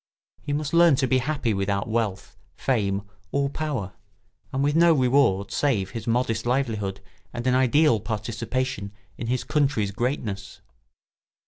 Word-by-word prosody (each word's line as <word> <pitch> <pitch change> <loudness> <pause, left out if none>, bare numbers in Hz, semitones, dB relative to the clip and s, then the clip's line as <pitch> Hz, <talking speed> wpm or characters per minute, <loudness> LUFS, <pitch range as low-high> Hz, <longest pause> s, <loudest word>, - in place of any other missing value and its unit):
He - - -5
must 145 +1 -2
learn 170 -3 +6
to 130 - +1
be 130 0 +2
happy 135 -4 -1
without 100 0 -1
wealth, 110 -4 -2 0.2
fame, 100 -6 0 0.3
or 140 0 0
power, 130 -12 -3 0.6
and 135 +1 0
with 145 +1 +1
no 170 0 +6
reward 125 -7 +2
save 110 -10 0
his 115 -1 -6
modest 115 -1 0
livelihood 110 -7 -1 0.3
and 120 0 -5
an 130 - +3
ideal 130 0 +4
participation 115 +1 -3 0.3
in 115 - -4
his 125 +1 0
country's 135 -9 +1
greatness. 110 -4 -3
120 Hz, 140 wpm, -25 LUFS, 105-140 Hz, 0.6 s, learn